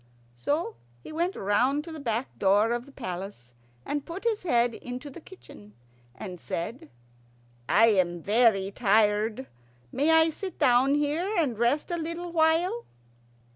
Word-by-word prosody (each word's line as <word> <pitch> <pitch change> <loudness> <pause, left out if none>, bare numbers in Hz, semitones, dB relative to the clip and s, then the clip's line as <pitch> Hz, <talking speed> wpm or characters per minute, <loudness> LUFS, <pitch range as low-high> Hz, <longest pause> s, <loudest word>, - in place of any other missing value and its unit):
So 285 - -2 0.3
he - - -9
went 340 +4 -1
round 250 +9 +1
to 330 - -9
the 320 - -7
back 235 -1 -3
door 205 +3 +3
of 240 +2 -3
the - - -14
palace, 185 - -7 0.3
and 290 -1 -2
put 340 +7 -8
his 455 -2 0
head 240 -8 +2
into 250 +5 -7
the 335 - -11
kitchen, 105 - -15 0.4
and 180 -4 -8
said, 175 - -5 0.8
"I 225 - +6
am 175 -5 +1
very 205 -3 +3
tired. 215 +3 +2 0.5
May 290 +4 +1
I 320 0 +5
sit 375 +2 -7
down 265 0 +4
here 310 +8 0
and 285 -9 +1
rest 240 +9 0
a 345 - -1
little 335 +2 -4
while?" 335 +7 +2
255 Hz, 150 wpm, -27 LUFS, 210-320 Hz, 0.8 s, I